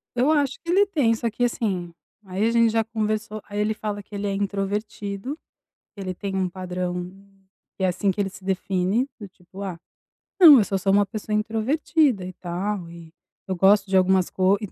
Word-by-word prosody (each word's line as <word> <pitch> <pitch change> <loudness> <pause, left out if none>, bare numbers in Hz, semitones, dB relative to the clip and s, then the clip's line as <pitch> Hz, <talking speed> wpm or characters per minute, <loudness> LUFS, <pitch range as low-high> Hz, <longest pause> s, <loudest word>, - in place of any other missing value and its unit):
Eu 260 +6 +3
acho 285 -3 +2
que 340 - -2
ele 400 +3 +5
tem, 290 - +2
só 230 +1 -2
que, 235 +3 -3
assim, 190 -8 -1 0.3
aí 190 +3 -1
a 230 - +2
gente 230 -1 +4
já 225 0 +2
conversou, 215 -1 -3
aí 205 0 -4
ele 210 +1 +1
fala 210 -1 -4
que 205 +1 -12
ele 200 0 -2
é 200 - -1
introvertido, 200 +5 -3 0.6
ele 190 -2 -4
tem 195 +2 -5
um 185 -1 0
padrão, 180 -1 -4 0.7
que 190 - -3
é 185 - +4
assim 195 +2 +1
que 190 - -8
ele 195 - -1
se 190 0 -14
define, 190 +5 0
do 205 - -8
tipo: 185 +1 -14
"Ah, 185 -4 -5 0.6
não, 320 -7 +10
eu 225 - +5
só 195 -1 -1
sou 195 +1 +1
uma 205 +1 +4
pessoa 210 +2 -5
introvertida 225 - +1
e 185 - -7
tal, 180 +1 -4
e 170 -1 -12 0.3
eu 190 - -1
gosto 195 +2 +4
de 190 - +4
algumas 185 -1 +3
co" 190 +2 +2
200 Hz, 200 wpm, -24 LUFS, 185-225 Hz, 0.7 s, não